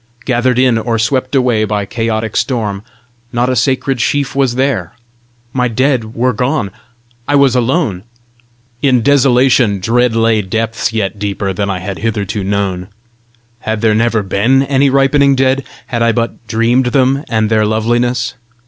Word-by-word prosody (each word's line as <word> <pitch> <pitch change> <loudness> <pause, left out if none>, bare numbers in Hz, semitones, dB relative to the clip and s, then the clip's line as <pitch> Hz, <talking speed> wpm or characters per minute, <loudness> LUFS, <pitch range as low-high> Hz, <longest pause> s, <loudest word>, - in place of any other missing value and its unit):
Gathered 125 -1 +1
in, 125 -3 +3
or 115 0 -1
swept 130 +4 -1
away 125 -5 +2
by 105 -1 -1
chaotic 110 +1 -3
storm, 105 -6 -1 0.5
not 120 +1 0
a 130 - 0
sacred 130 0 0
sheaf 140 +2 -1
was 135 -3 +1
there! 130 - -1 0.6
My 125 -1 +1
dead 120 -2 -1
were 125 +2 +1
gone! 125 -3 -1 0.6
I 145 - +1
was 140 -3 +4
alone! 125 - 0 0.8
In 130 -4 +2
desolation 125 -5 +3
dread 120 +4 +1
lay 115 -1 +2
depths 115 +4 -2
yet 105 -2 -2
deeper 100 -1 -2
than 100 +2 -2
I 95 - -1
had 95 +1 -6
hitherto 105 -2 -2
known! 95 -2 -2 0.7
Had 110 -2 -3
there 110 -1 +3
never 115 -1 +1
been 115 +8 +2
any 140 0 +2
ripening 140 +1 +3
dead? 135 +1 +1 0.2
Had 120 -2 -3
I 115 0 +3
but 115 0 -3
dreamed 115 +3 +1
them 135 +2 +1
and 110 -1 0
their 110 -1 +3
loveliness? 120 +1 0
115 Hz, 155 wpm, -14 LUFS, 110-130 Hz, 0.8 s, was